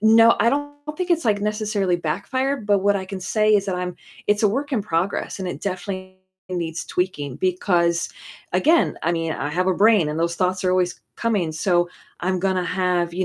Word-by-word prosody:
No, 225 +2 +6
I 230 - +4
don't 290 +2 -1 0.2
think 365 -1 -3
it's, 335 -4 +2
like, 205 -2 +2
necessarily 210 -3 0
backfired, 220 - -2
but 205 -1 +4
what 200 +1 +3
I 190 - -3
can 190 0 -6
say 215 +3 +2
is 200 -1 +2
that 190 - -1
I'm 180 0 -3 0.3
it's 205 +1 +2
a 210 - +5
work 275 +7 -2
in 225 - +1
progress, 185 +1 -1
and 185 - -3
it - - -6
definitely 185 -1 -5 0.3
needs 170 -3 -3
tweaking 145 -8 -2
because 175 -1 +1 0.4
again, 330 +2 +3
I 170 - +2
mean, 165 -1 -1
I 145 - -3
have 185 +4 0
a - - +4
brain 210 -5 +4
and 150 +1 -3
those 170 0 0
thoughts 185 0 0
are 185 - +3
always 180 -1 0 0.2
coming, 200 -9 0
so 175 +2 +1 0.3
I'm 185 0 0
gonna 185 -1 +1
have, 180 -2 0
you 185 +1 0
185 Hz, 205 wpm, -22 LUFS, 175-210 Hz, 0.4 s, No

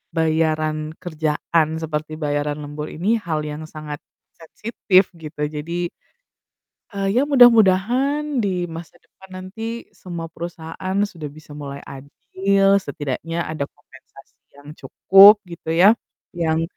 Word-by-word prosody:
bayaran 155 -1 +1 0.3
kerjaan, 155 -1 0
seperti 155 0 -4
bayaran 145 0 -1
lembur 150 +1 -6
ini 210 +8 +1
hal 160 -5 -2
yang 150 +1 -6
sangat 155 -1 -8 0.4
sensitif, 190 +2 +1
gitu. 155 -1 -9
Jadi 170 +3 -3 1.0
eee, 195 0 -1
ya - - +5
mudah-mudahan 250 +4 +4
di 200 - 0 0.3
masa 165 0 -10
depan 190 - -19
nanti, 185 +4 -9 0.3
semua 175 -4 -7
perusahaan 170 +3 -6 0.2
sudah 160 -4 -7
bisa 155 -1 -16
mulai 140 -1 -8
adil, 190 +8 0
setidaknya 160 -1 -5
ada 155 -3 -2
kompensasi 135 -2 -20 0.2
yang 145 +1 -13
cukup, 195 +9 +7 0.2
gitu 170 -1 -10
ya, 180 +4 +6 0.4
yang 165 -3 0
165 Hz, 120 wpm, -21 LUFS, 150-190 Hz, 1.0 s, cukup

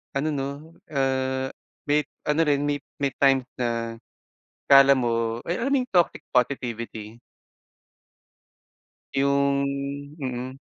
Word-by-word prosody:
ano 140 +3 0
'no, 140 +3 -4 0.2
ah, 130 -2 0 0.3
may 145 -1 +1 0.2
ano 150 +1 0
rin, 145 -1 +2
may 145 0 0 0.2
may 140 -1 +1
times 135 -2 +4 0.2
na, 115 -1 -2 0.7
akala 140 0 +9
mo 115 -2 -1
ay, 170 - -1
alam 260 +4 -1
mo - - +4
yung 250 - -9
toxic 175 -2 +2
positivity? 115 -3 -2 2.0
Yung 140 0 +2 0.6
mm. 130 +1 -4
135 Hz, 110 wpm, -25 LUFS, 125-140 Hz, 2.0 s, akala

